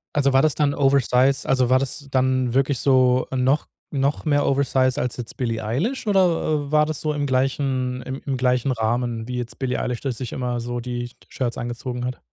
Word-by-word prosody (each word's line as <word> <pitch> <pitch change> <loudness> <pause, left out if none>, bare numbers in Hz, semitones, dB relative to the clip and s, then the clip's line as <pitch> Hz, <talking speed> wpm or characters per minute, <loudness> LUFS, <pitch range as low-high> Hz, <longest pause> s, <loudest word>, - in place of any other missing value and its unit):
Also, 140 -2 +3
war 135 +2 +4
das 155 - +3
dann 145 -2 +1
oversize 135 -1 +2
also, 130 -2 +3
war 130 - +5
das 140 +2 -4
dann 130 -2 +1
wirklich 135 0 +1
so 130 -2 +3
noch 130 +3 +1 0.2
noch 140 +2 -1
mehr 145 -2 +2
oversize 130 -2 +2
als 125 0 -2
jetzt 120 -3 -6
Billie 115 -3 -2
Eilish 175 - -2
oder 165 -7 +1
war 150 0 +4
das 155 -3 -3
so 155 -1 -1
im 145 -1 -1
gleichen 130 -1 0
im 130 +1 -6
im 135 -2 -1
gleichen 125 +1 +1
Rahmen, 115 0 -1
wie 125 0 -4
jetzt 120 -1 -5
Billie 130 -2 -2
Eilish 125 -2 -3
das 130 -4 -3
sich 125 -4 -5
immer 125 -1 -2
so 120 +1 -4
die 120 0 -4
Sh 120 - -17 0.2
Shirts 120 -3 -3
angezogen 120 +1 -4
hat? 125 0 -5
130 Hz, 205 wpm, -23 LUFS, 125-140 Hz, 0.2 s, war